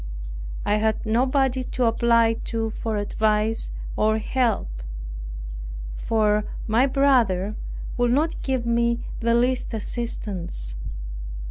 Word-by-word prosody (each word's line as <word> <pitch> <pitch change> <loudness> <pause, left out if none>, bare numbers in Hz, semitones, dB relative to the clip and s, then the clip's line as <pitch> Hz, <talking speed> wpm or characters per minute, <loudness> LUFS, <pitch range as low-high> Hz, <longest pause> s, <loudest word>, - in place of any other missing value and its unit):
I 210 - +3
had 220 +1 +1
nobody 260 +3 +2
to 250 0 0
apply 230 0 +4
to 225 -1 -1
for 220 0 -2
advice 215 +1 +1 0.3
or 220 +1 +3
help; 220 - 0 1.1
for 210 - +2 0.2
my 230 +5 +4
brother 235 -8 +3 0.4
would 245 -1 +3
not 310 +6 +1
give 260 -3 -1
me 235 0 +2 0.2
the 235 0 +3
least 245 0 +1
assistance. 195 - -3
230 Hz, 105 wpm, -24 LUFS, 215-245 Hz, 1.1 s, apply